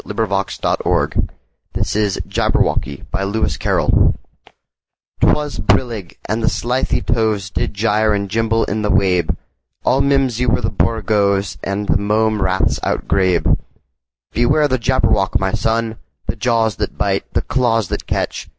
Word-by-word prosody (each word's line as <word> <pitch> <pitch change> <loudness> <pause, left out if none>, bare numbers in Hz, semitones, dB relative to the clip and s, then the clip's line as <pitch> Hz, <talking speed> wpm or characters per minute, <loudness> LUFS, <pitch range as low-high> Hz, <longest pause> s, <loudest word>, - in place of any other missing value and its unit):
Lewis 100 -2 -2
Carroll - - +1 0.7
1832–98 105 -2 -1
Jabberwocky 70 -1 0
CarrollL 95 -5 +1 1.1
'T - - +5
WAS 150 -1 0
brillig, 110 -8 0
and 110 +2 -1
the - - +3
slithy 125 +2 -1
tovesDid 110 -4 0
gyre 110 +1 +2
and 100 -1 0
gimble 115 +2 +1
in 105 +2 -2
the 105 - -1
wabe; 90 -4 +2 0.5
All 135 +2 +3
mimsy 135 -3 +1
were 115 - +2
the 105 - -1
borogoves, 100 -2 +1
And 100 +1 -2
the - - +2
mome 105 +1 +1
raths 95 -3 +1
outgrabe."Beware 95 - -1
the 130 -2 0
Jabberwock, 120 -5 +2
my 95 0 0
son! 115 0 0 0.3
The - - -3
jaws 115 -4 +1
that - - -3
bite, - - -1
the - - +1
claws 115 -6 +1
that - - -4
catch! - - -2
110 Hz, 130 wpm, -18 LUFS, 100-115 Hz, 1.1 s, T